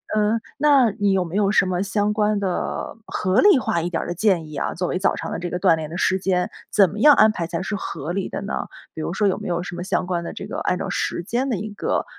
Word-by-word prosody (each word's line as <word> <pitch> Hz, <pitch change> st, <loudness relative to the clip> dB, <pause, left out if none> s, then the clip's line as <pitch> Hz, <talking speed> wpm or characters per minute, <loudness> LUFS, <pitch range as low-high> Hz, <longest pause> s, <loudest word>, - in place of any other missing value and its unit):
嗯， 215 Hz, +2 st, +2 dB, 0.2 s
那 275 Hz, -5 st, +4 dB
你 205 Hz, -1 st, 0 dB
有 185 Hz, -1 st, +2 dB
没 170 Hz, +3 st, -7 dB
有 205 Hz, -1 st, +2 dB
什 195 Hz, -, +4 dB
么 180 Hz, 0 st, -1 dB
相 205 Hz, +1 st, 0 dB
关 210 Hz, -1 st, +1 dB
的、 185 Hz, -3 st, -3 dB
合 185 Hz, +2 st, +1 dB
理 405 Hz, -8 st, +6 dB
化 170 Hz, -7 st, -1 dB
一 175 Hz, -, -2 dB
点 165 Hz, -, -2 dB
儿 -, -, -7 dB
的 175 Hz, -, -2 dB
建 180 Hz, -4 st, +1 dB
议 150 Hz, -, -9 dB
啊， 140 Hz, -, -2 dB
作 180 Hz, +1 st, -2 dB
为 -, -, -1 dB
早 195 Hz, -, +2 dB
上 165 Hz, -, -5 dB
的 -, -, -3 dB
这 175 Hz, 0 st, -4 dB
个 180 Hz, -, -3 dB
锻 165 Hz, -, +4 dB
炼 155 Hz, -1 st, -5 dB
的 170 Hz, -, -6 dB
时 190 Hz, +1 st, +1 dB
间， 180 Hz, -1 st, 0 dB, 0.2 s
怎 195 Hz, -4 st, +5 dB
么 210 Hz, -, -7 dB
样 295 Hz, +4 st, +8 dB
安 215 Hz, 0 st, +6 dB
排 170 Hz, -5 st, -3 dB
才 170 Hz, +1 st, -3 dB
是 205 Hz, +2 st, -3 dB
合 170 Hz, -5 st, -5 dB
理 190 Hz, +1 st, -2 dB
的 -, -, -5 dB
呢？ 200 Hz, -, -4 dB, 0.3 s
比 160 Hz, -, -6 dB
如 170 Hz, -, -3 dB
说 205 Hz, +1 st, +1 dB
有 190 Hz, -, +1 dB
没 -, -, -6 dB
有 175 Hz, -1 st, -1 dB
什 180 Hz, -, -7 dB
么 175 Hz, -, -5 dB
相 185 Hz, -, -1 dB
关 175 Hz, -1 st, -2 dB
的 -, -, -5 dB
这 -, -, -7 dB
个， -, -, -6 dB
按 180 Hz, -, 0 dB
照 -, -, -4 dB
时 175 Hz, -, -2 dB
间 250 Hz, +7 st, -1 dB
的 225 Hz, -, 0 dB
一 210 Hz, +2 st, -6 dB
个 -, -, -1 dB
190 Hz, 315 characters per minute, -22 LUFS, 175-210 Hz, 0.3 s, 样